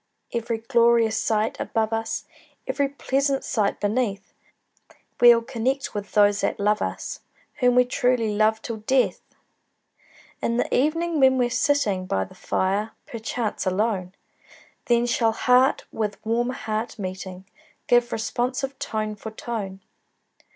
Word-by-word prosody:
Every 230 Hz, -1 st, -1 dB
glorious 230 Hz, -1 st, +3 dB
sight 220 Hz, 0 st, 0 dB
above 225 Hz, -1 st, -1 dB
us, 225 Hz, 0 st, -2 dB, 0.4 s
Every 280 Hz, -1 st, 0 dB
pleasant 275 Hz, 0 st, 0 dB
sight 215 Hz, -6 st, 0 dB
beneath, 205 Hz, -2 st, -1 dB, 0.9 s
We'll 240 Hz, -1 st, +7 dB
connect 265 Hz, +2 st, -2 dB
with 205 Hz, -1 st, -6 dB
those 205 Hz, -1 st, +4 dB
that -, -, -1 dB
love 210 Hz, +1 st, +2 dB
us, -, -, -4 dB, 0.4 s
Whom 250 Hz, -2 st, +4 dB
we 250 Hz, 0 st, +6 dB
truly 245 Hz, -3 st, +1 dB
love 215 Hz, +1 st, +2 dB
till 230 Hz, -2 st, -4 dB
death! 255 Hz, +5 st, +1 dB, 1.2 s
In 235 Hz, -, 0 dB
the -, -, 0 dB
evening, 330 Hz, +4 st, +1 dB
when 260 Hz, -1 st, +5 dB
we're 245 Hz, -1 st, +1 dB
sitting 210 Hz, -11 st, +1 dB
By 95 Hz, -, 0 dB
the -, -, -12 dB
fire, 200 Hz, +4 st, -1 dB
perchance 225 Hz, -2 st, -3 dB
alone, 190 Hz, -1 st, -1 dB, 0.7 s
Then 240 Hz, 0 st, +3 dB
shall 230 Hz, -2 st, +2 dB
heart 250 Hz, +3 st, +3 dB
with 210 Hz, -2 st, -2 dB
warm 235 Hz, +2 st, +1 dB
heart 220 Hz, -2 st, -3 dB
meeting, 185 Hz, -1 st, -6 dB, 0.4 s
Give 240 Hz, -1 st, +3 dB
responsive 255 Hz, +4 st, -2 dB
tone 215 Hz, -1 st, -2 dB
for 215 Hz, +2 st, -7 dB
tone. 215 Hz, -4 st, -5 dB
230 Hz, 130 wpm, -24 LUFS, 210-250 Hz, 1.2 s, We'll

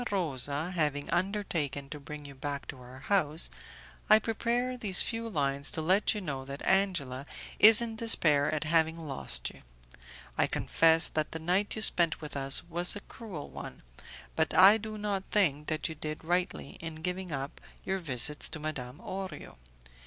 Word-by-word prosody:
Rosa 155 Hz, -3 st, -3 dB
having 150 Hz, -5 st, -1 dB
undertaken 175 Hz, -7 st, -2 dB
to 150 Hz, -, -6 dB
bring 150 Hz, +1 st, -9 dB
you 140 Hz, -, -10 dB
back 140 Hz, +1 st, -5 dB
to -, -, -7 dB
our 125 Hz, +1 st, -13 dB
house, 160 Hz, -2 st, +2 dB, 0.6 s
I 215 Hz, -, +9 dB
prepare 235 Hz, +3 st, -1 dB
these 205 Hz, -6 st, +3 dB
few 230 Hz, 0 st, -4 dB
lines 140 Hz, -5 st, 0 dB
to -, -, -1 dB
let 190 Hz, +6 st, +2 dB
you 210 Hz, -, -4 dB
know 140 Hz, -7 st, -5 dB
that 140 Hz, +1 st, -8 dB
Angela 150 Hz, -9 st, 0 dB, 0.3 s
is 220 Hz, +2 st, +8 dB
in 225 Hz, -1 st, -6 dB
despair 155 Hz, -11 st, +4 dB
at 155 Hz, 0 st, -2 dB
having 160 Hz, 0 st, +1 dB
lost 135 Hz, -, -5 dB
you. -, -, -17 dB, 0.8 s
I -, -, +3 dB
confess 165 Hz, 0 st, +3 dB
that 155 Hz, -1 st, -3 dB
the -, -, -3 dB
night 180 Hz, +6 st, 0 dB
you 220 Hz, -, +1 dB
spent 170 Hz, -5 st, +4 dB
with 150 Hz, -2 st, -9 dB
us 135 Hz, +1 st, +1 dB
was 175 Hz, +3 st, 0 dB
a 205 Hz, -, -7 dB
cruel 200 Hz, -, -9 dB
one, -, -, -9 dB, 0.5 s
but 160 Hz, 0 st, 0 dB
I 195 Hz, +4 st, +8 dB
do 215 Hz, 0 st, -7 dB
not 205 Hz, -2 st, -2 dB
think 150 Hz, -8 st, +1 dB
that 155 Hz, -1 st, -1 dB
you 160 Hz, -, -6 dB
did 155 Hz, 0 st, -6 dB
rightly 175 Hz, -3 st, -2 dB
in 160 Hz, -1 st, -8 dB
giving 180 Hz, 0 st, -3 dB
up 140 Hz, -1 st, -5 dB, 0.2 s
your 190 Hz, 0 st, -1 dB
visits 145 Hz, -3 st, +3 dB
to 160 Hz, -, -6 dB
Madame 140 Hz, -4 st, -6 dB
Orio. 190 Hz, -5 st, -7 dB
160 Hz, 175 wpm, -29 LUFS, 145-195 Hz, 0.8 s, I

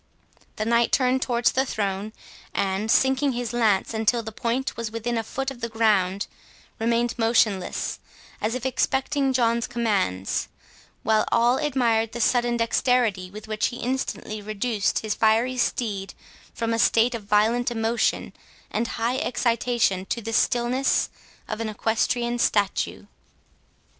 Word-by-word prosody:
The 215 Hz, -, -2 dB
Knight 235 Hz, +1 st, +2 dB
turned 260 Hz, 0 st, +2 dB
towards 240 Hz, -1 st, +2 dB
the 265 Hz, -, +2 dB
throne, 205 Hz, -4 st, -2 dB, 0.4 s
and, 195 Hz, +2 st, -1 dB
sinking 265 Hz, +3 st, +3 dB
his 240 Hz, -2 st, -3 dB
lance, 220 Hz, -4 st, +2 dB
until 225 Hz, +2 st, +1 dB
the 220 Hz, -, -6 dB
point 235 Hz, +4 st, -2 dB
was 230 Hz, -1 st, -4 dB
within 230 Hz, +2 st, -3 dB
a 225 Hz, -, +1 dB
foot 270 Hz, +4 st, -4 dB
of 250 Hz, -3 st, -11 dB
the 235 Hz, -, -2 dB
ground, 200 Hz, -4 st, +2 dB, 0.5 s
remained 235 Hz, +1 st, +1 dB
motionless, 225 Hz, -5 st, +1 dB, 0.4 s
as 220 Hz, +3 st, -1 dB
if 255 Hz, 0 st, -5 dB
expecting 265 Hz, +1 st, +1 dB
John's 235 Hz, -2 st, +1 dB
commands; 200 Hz, -, -1 dB, 0.6 s
while 215 Hz, 0 st, +3 dB
all 235 Hz, +2 st, +4 dB
admired 235 Hz, -6 st, +1 dB
the 240 Hz, -, -5 dB
sudden 240 Hz, 0 st, +2 dB
dexterity 230 Hz, -5 st, +1 dB
with 215 Hz, +3 st, -10 dB
which 215 Hz, -1 st, 0 dB
he 240 Hz, -, -6 dB
instantly 245 Hz, -4 st, -3 dB
reduced 215 Hz, 0 st, -1 dB
his 215 Hz, -2 st, -1 dB
fiery 225 Hz, +4 st, +2 dB
steed 200 Hz, -7 st, -1 dB, 0.4 s
from 230 Hz, -1 st, -2 dB
a 230 Hz, -, 0 dB
state 230 Hz, +3 st, +4 dB
of 225 Hz, -3 st, -5 dB
violent 220 Hz, +4 st, +2 dB
emotion 230 Hz, 0 st, 0 dB, 0.4 s
and 225 Hz, +2 st, -1 dB
high 240 Hz, +3 st, 0 dB
excitation 235 Hz, -8 st, 0 dB
to 235 Hz, -, -2 dB
the 225 Hz, 0 st, -5 dB
stillness 245 Hz, +3 st, +1 dB, 0.4 s
of 215 Hz, +1 st, -4 dB
an 225 Hz, -, -2 dB
equestrian 235 Hz, +3 st, 0 dB
statue. 205 Hz, -4 st, 0 dB
230 Hz, 145 wpm, -24 LUFS, 215-245 Hz, 0.6 s, all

